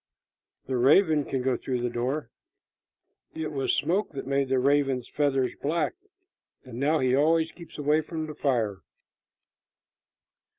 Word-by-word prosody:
"The 130 -1 -2
raven 150 +3 +4
can 130 -2 -2
go 130 -1 +1
through 125 0 -3
the 120 - 0
door." 125 +2 -2 1.0
"It 160 -1 -3
was 135 -2 0
smoke 180 +5 0
that 135 - -5
made 135 0 0
the 135 - +2
raven's 135 -1 +1
feathers 135 -3 0
black, 160 +4 0 0.7
and 125 -2 -8
now 150 +4 +2
he 130 -3 +2
always 160 +3 +3
keeps 170 -2 -13
away 150 +1 +2
from 160 0 -5
the 155 - -7
fire." 115 -10 -1
140 Hz, 140 wpm, -27 LUFS, 130-155 Hz, 1.0 s, raven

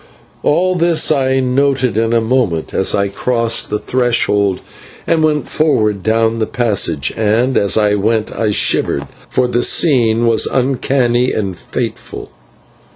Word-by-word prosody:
All 185 +5 +1
this 170 -2 +2
I 135 -2 +1
noted 130 -2 0
in 115 +1 0
a 115 - +3
moment 110 -9 -1
as 95 - 0
I 100 0 0
crossed 115 +2 -1
the 105 - -1
threshold 105 -6 0 0.5
and 165 - +1
went 150 -1 0
forward 110 -10 0
down 115 +2 0
the 110 - -1
passage, 100 - -1
and 115 +4 0
as 100 +1 +1
I 105 -1 +2
went 110 +2 -1
I 110 -2 -1
shivered, 70 -7 +1 0.2
for 125 - 0
the 120 0 0
scene 120 -7 +2
was 115 -1 +2
uncanny 125 -1 0
and 100 -4 -3
fateful. - - -6
115 Hz, 145 wpm, -15 LUFS, 105-130 Hz, 0.5 s, a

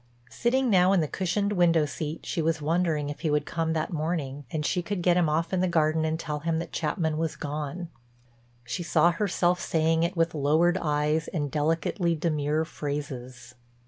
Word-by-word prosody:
Sitting 260 +2 +1
now 185 0 +5
in 195 - +4
the 155 - +1
cushioned 200 +5 -1
window 170 -4 +4
seat 155 +2 -5
she 165 - -1
was 160 0 0
wondering 155 -1 0
if 145 - -8
he 160 - -1
would 150 0 +1
come 165 -1 -1
that 160 +1 -2
morning 150 -3 -3
and 150 +1 -3
she 180 - +1
could 180 0 -3
get 175 -1 +4
him 175 -3 +3
off 165 +3 0
in 185 - +2
the 185 - +2
garden 160 -2 +2
and 160 +1 -1
tell 150 -3 -3
him 165 +1 -1
that 170 - -4
Chapman 155 0 -1
was 165 -1 -1
gone. 150 +4 -4 0.8
She 125 +8 -4
saw 170 0 +3
herself 180 -1 +1
saying 160 0 +1
it 170 +1 -1
with 165 0 +2
lowered 160 +5 +2
eyes 150 +1 0
and 145 -5 -3
delicately 165 +3 0
demure 155 -1 0
phrases. 130 -6 -6
160 Hz, 190 wpm, -27 LUFS, 150-175 Hz, 0.8 s, now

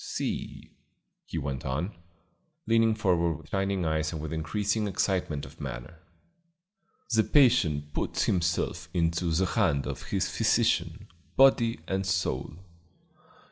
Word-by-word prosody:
"See," - - -4 0.6
he - - -5
went 70 -3 -3
on, 75 +9 -2 0.7
leaning 115 -1 +3
forward 85 -6 +1
with 80 0 -16
shining 95 -2 0
eyes 80 -1 0
and 80 - -5
with 80 +1 -5
increasing 100 +7 -1
excitement 95 -6 -1
of 75 +5 -13
manner, 65 +4 -7 1.1
"the 110 0 +5
patient 90 - +3
puts - - -1
himself 85 -2 0
into 85 0 +1
the 85 +4 +2
hands 90 -8 +1
of - - -5
his 100 -1 0
physician, 105 -5 +1 0.3
body 120 -7 +5
and 95 +2 -1
soul. 85 -7 -1
85 Hz, 125 wpm, -28 LUFS, 80-105 Hz, 1.1 s, the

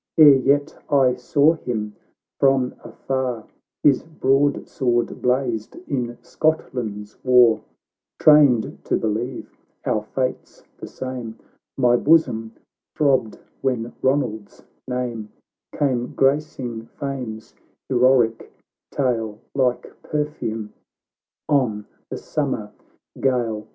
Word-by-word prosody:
Ere 150 -3 +9
yet 140 +3 +2
I 135 -4 +4
saw 140 +5 +3
him, 110 -9 -4 0.4
while 135 -2 +3
afar 125 0 -3 0.4
His 140 -3 +5
broadsword 135 -4 0
blazed 125 -4 0
in 120 -3 -2
Scotland's 110 -9 -2
war, 125 -3 +5 0.6
Trained 145 -7 +4
to - - +1
believe 115 +4 -3 0.3
our 110 - +1
fates 130 +4 -4 0.2
the - - -7
same, 125 -4 -6 0.4
My 120 -2 +4
bosom 115 -8 +2 0.4
throbbed 135 -7 +2 0.2
when 120 -3 -1
Ronald's 120 -6 -1 0.2
name 120 -4 -3 0.5
Came 125 -4 0
gracing 135 -5 0
Fame's 130 -6 -5 0.3
heroic 125 -3 +2 0.4
tale, 115 -6 -1 0.2
Like 125 -3 0
perfume 130 -8 -3 0.7
on 115 -8 +1 0.2
the - - -4
summer 130 -8 -3 0.5
gale. 120 -5 0
125 Hz, 95 wpm, -22 LUFS, 115-140 Hz, 0.7 s, Ere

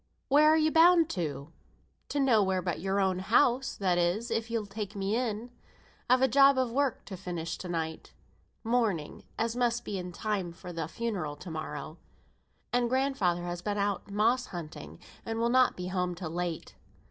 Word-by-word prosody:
Where 300 +2 +6
are 315 - +5
you 310 0 +3
bound 330 0 +6
to?" 150 - -4 0.6
"To 290 - -1
nowhere 205 -9 +3
but 175 -4 -2
your 195 +2 0
own 190 -2 +1
house 245 +6 +2
(that 180 -3 +1
is, 185 +8 0
if 225 +1 -1
you'll 230 -2 -1
take 205 +1 -6
me 200 +2 -1
in). 235 -1 -2 0.6
I've 255 +1 +5
a - - +6
job 275 +1 +6
of 255 -2 +1
work 275 0 0
to 195 - -7
finish 175 -3 -4
to 180 - -7
night; 160 -2 -4 0.5
mourning, 220 -10 0 0.2
as 230 +1 -1
must 240 -1 0
be 200 -2 -3
in 180 0 -6
time 190 -2 -3
for 175 +1 -9
the 165 -2 -3
funeral 180 -7 -3
to 170 +4 -9
morrow; 155 0 -6 0.7
and 245 -1 +2
grandfather 250 -10 +1
has 175 0 -4
been 205 +2 -2
out 200 0 -1
moss 230 +5 +2
hunting, 155 - -8 0.3
and 225 0 -4
will 230 +1 +1
not 255 +1 +4
be 180 0 -4
home 180 -1 -1
till 170 -2 -6
late." 175 -1 -4
200 Hz, 180 wpm, -29 LUFS, 175-240 Hz, 0.7 s, Where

